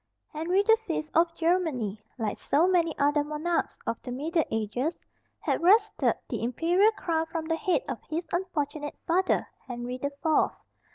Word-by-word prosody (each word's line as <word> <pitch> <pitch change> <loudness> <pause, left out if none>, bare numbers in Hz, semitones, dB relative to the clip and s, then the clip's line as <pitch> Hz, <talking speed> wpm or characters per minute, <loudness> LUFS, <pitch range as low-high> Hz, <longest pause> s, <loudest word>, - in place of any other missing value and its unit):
Henry 350 +6 +1
the 450 +1 +5
Fifth 310 -2 -2
of 335 +1 +4
Germany, 315 - 0 0.2
like 220 -4 -1
so 315 +5 +2
many 340 -4 +2
other 290 +1 +3
monarchs 305 +3 -1
of 230 - -2
the 250 - -7
middle 315 +6 0
ages, 225 +8 -2 0.4
had - - 0
wrested 395 +6 +4
the - - -3
imperial 340 - +3
crown 325 -5 -1
from 325 -1 -4
the 325 0 0
head 375 +6 +1
of - - -4
his 330 +2 -2
unfortunate 305 -5 -2
father, 370 +3 +2 0.2
Henry 245 0 -5
the 280 - -1
Fourth. 315 -1 +3
320 Hz, 160 wpm, -28 LUFS, 280-345 Hz, 0.4 s, the